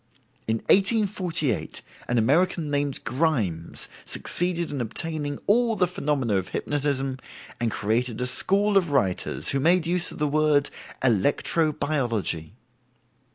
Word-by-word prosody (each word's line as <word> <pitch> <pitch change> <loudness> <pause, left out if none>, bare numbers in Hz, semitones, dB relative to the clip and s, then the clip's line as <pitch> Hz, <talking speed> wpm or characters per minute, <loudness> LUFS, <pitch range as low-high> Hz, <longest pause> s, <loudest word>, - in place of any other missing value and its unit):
In 110 - +1 0.2
1848 185 - +1 0.2
an 120 - 0
American 155 +6 +2
named 145 -1 -1
Grimes 115 - -1 0.2
succeeded 175 -2 -1
in 140 -3 -3
obtaining 145 +4 -3
all 230 +2 +3
the 185 - +3
phenomena 140 - -1
of 95 - -2
hypnotism, 135 -2 -2 0.4
and 120 -1 0
created 110 +3 -1
a 125 - -1
school 200 +10 +2
of 180 -4 +2
writers 100 -10 0
who 135 - +1
made 170 +4 +3
use 175 +1 0
of - - -10
the 150 - 0
word 150 -1 +2 0.3
"electro 140 - +2
biology." 115 - -2
145 Hz, 125 wpm, -25 LUFS, 120-170 Hz, 0.4 s, all